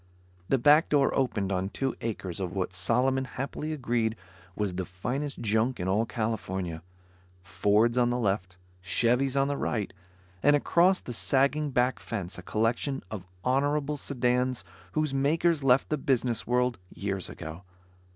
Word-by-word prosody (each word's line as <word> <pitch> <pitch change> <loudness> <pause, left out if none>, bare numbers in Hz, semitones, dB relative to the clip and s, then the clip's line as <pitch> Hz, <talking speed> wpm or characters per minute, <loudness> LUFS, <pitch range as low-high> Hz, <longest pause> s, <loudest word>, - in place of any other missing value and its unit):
The 135 - +4
back 150 +6 +5
door 140 -2 +3
opened 105 -7 0
on 95 0 -1
two 135 +5 -2
acres 100 -6 -4
of 90 -2 -3
what 95 -1 -2
Solomon 125 +8 +2
happily 135 +4 -4
agreed 120 -6 0 0.4
was 105 -3 -1
the 95 +1 -2
finest 125 +12 -4
junk 110 +3 +1
in 90 - -2
all 105 +4 +1
California. 95 -7 -3 0.6
Fords 105 +6 +2
on 120 -1 +3
the 120 - 0
left, 95 -5 -1 0.3
Chevys 125 +7 +2
on 135 - +3
the 145 0 -1
right, 105 -4 -2 0.5
and 145 +1 +5
across 175 +5 +3
the 120 - -6
sagging 140 +4 +1
back 125 -1 +1
fence, 95 -5 -5
a - - -7
collection 115 +8 -1
of 95 -4 -6 0.2
honorable 145 +3 +1
sedans 125 -5 0 0.3
whose 155 -2 0
makers 150 +3 +2
left 130 0 +4
the 155 - 0
business 125 -4 0
world 125 -1 +1
years 100 -2 -3
ago. 80 +1 -8
125 Hz, 150 wpm, -28 LUFS, 100-135 Hz, 0.6 s, back